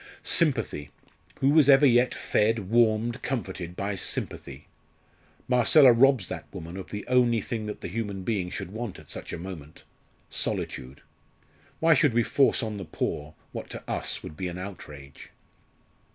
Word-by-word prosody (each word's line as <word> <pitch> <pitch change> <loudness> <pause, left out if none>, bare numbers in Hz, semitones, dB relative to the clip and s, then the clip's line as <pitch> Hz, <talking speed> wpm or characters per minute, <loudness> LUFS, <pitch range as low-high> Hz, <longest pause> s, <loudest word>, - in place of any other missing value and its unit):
"Sympathy! 120 - +1 0.5
who 135 +1 +4
was 150 -2 +5
ever 140 +1 +7
yet 125 -1 +4
fed, 105 -2 0
warmed, 115 +1 +2
comforted 95 -9 -4
by 100 +2 -2
sympathy? 95 - -4 0.8
Marcella 125 +2 +6
robs 125 -5 +4
that - - -7
woman 85 +2 -8
of 95 -1 -8
the 105 - -6
only 125 -2 +3
thing 110 +1 -4
that 105 - -6
the - - -4
human 100 -1 -4
being 95 -3 -1
should 95 0 -6
want 110 -1 -5
at - - -14
such - - -7
a - - -4
moment 85 -4 -9 0.5
solitude. 65 +3 -4 0.8
Why 165 0 +5
should 135 -4 +3
we 120 - +4
force 135 +1 +2
on 110 -2 -4
the 95 - -6
poor 75 -1 -4 0.2
what - - -7
to - - -8
us - - -2
would 75 - -8
be 90 +3 -4
an 90 0 -6
outrage?" 75 -7 -10
110 Hz, 160 wpm, -27 LUFS, 90-125 Hz, 0.8 s, ever